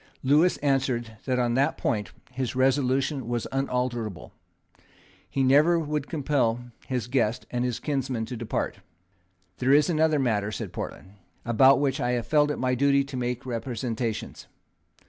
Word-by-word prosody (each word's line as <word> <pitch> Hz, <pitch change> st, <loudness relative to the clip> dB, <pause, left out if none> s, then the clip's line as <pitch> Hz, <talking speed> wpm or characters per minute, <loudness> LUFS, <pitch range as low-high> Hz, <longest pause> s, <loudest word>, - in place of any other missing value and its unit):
Lewis 150 Hz, +7 st, +4 dB
answered 130 Hz, -5 st, 0 dB
that 130 Hz, -1 st, 0 dB
on 120 Hz, -1 st, +1 dB
that 135 Hz, +3 st, +1 dB
point 105 Hz, -7 st, -1 dB, 0.2 s
his 130 Hz, -1 st, -3 dB
resolution 135 Hz, 0 st, +1 dB
was 120 Hz, -1 st, -2 dB
unalterable. 125 Hz, -7 st, -2 dB, 1.0 s
He 135 Hz, -, 0 dB
never 150 Hz, +6 st, +5 dB
would 150 Hz, -3 st, -2 dB
compel 125 Hz, -6 st, 0 dB, 0.2 s
his 125 Hz, -4 st, -2 dB
guest 120 Hz, -1 st, 0 dB
and 120 Hz, 0 st, -1 dB, 0.2 s
kinsman 135 Hz, -5 st, -1 dB
to 125 Hz, -, -6 dB
depart. 115 Hz, -1 st, -3 dB, 0.8 s
"There 130 Hz, +1 st, +2 dB
is 150 Hz, +4 st, +4 dB
another 155 Hz, -1 st, +3 dB
matter," 110 Hz, -6 st, 0 dB
said -, -, -5 dB
Portland, 100 Hz, +2 st, -7 dB, 0.3 s
"about 130 Hz, +4 st, +5 dB
which 140 Hz, -1 st, 0 dB
I 125 Hz, 0 st, +1 dB
have 120 Hz, -2 st, -1 dB
felt 150 Hz, +3 st, +3 dB
it 145 Hz, -, -2 dB
my 125 Hz, 0 st, 0 dB
duty 140 Hz, +2 st, +3 dB
to 135 Hz, -1 st, -8 dB
make 125 Hz, 0 st, -3 dB
representations. 115 Hz, -2 st, -4 dB
130 Hz, 145 wpm, -26 LUFS, 120-140 Hz, 1.0 s, never